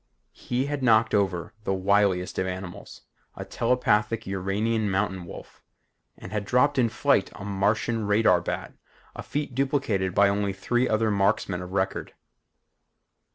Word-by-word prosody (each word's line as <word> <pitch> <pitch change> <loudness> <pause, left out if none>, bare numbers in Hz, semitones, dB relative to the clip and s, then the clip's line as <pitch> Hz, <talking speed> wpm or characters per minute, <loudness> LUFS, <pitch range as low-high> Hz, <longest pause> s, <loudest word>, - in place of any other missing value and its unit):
He 125 +2 -2
had 145 -1 -3
knocked 110 -3 +4
over 95 -5 0
the 95 - 0
wiliest 95 -1 +1
of 95 - 0
animals, 90 -1 -7 0.3
a - - -7
telepathic 115 -2 +1
Uranian 100 +3 -1
mountain 95 -2 -1
wolf - - -11 0.6
and 90 - -10
had 105 -1 -2
dropped 130 +6 +2
in 120 -2 +3
flight - - +1
a 100 - -8
Martian 105 +2 0
radar 105 -4 +4
bat, - - -4 0.4
a - - -6
feat 145 -2 -4
duplicated 120 -9 0
by 100 - +5
only 100 0 0
three 120 +6 0
other 110 0 +1
marksmen 100 -2 0
of 90 +1 -8
record. 95 0 -2
105 Hz, 145 wpm, -26 LUFS, 95-115 Hz, 0.6 s, by